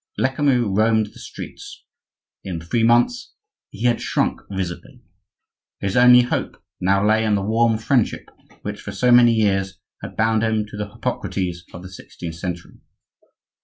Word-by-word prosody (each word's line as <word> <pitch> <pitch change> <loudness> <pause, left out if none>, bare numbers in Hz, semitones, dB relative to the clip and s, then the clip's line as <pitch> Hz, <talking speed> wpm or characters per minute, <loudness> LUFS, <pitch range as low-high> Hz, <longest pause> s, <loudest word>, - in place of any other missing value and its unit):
Lecamus 130 -1 +2
roamed 110 +1 +3
the - - -14
streets; - - -10 0.6
in 90 -4 -5
three 85 +8 -1
months 120 - +2 0.3
he 105 - -9
had 120 -1 +2
shrunk - - -1
visibly. 95 -3 -6 0.8
His 95 -1 -2
only 125 0 +7
hope 120 - -3 0.2
now 100 +2 +2
lay 110 +1 +3
in 105 -2 +2
the 100 - -1
warm 115 +2 +2
friendship 115 +1 0 0.4
which - - -5
for - - -7
so 125 -1 +2
many 120 -1 +7
years 95 -4 0 0.2
had - - -9
bound 110 0 +2
him 110 -1 0
to - - -10
the 105 -1 -5
Hippocrates 90 -4 -3
of 85 - -10
the 95 - -10
sixteenth 85 -2 -9
century. 85 0 -6
110 Hz, 155 wpm, -21 LUFS, 95-120 Hz, 0.8 s, only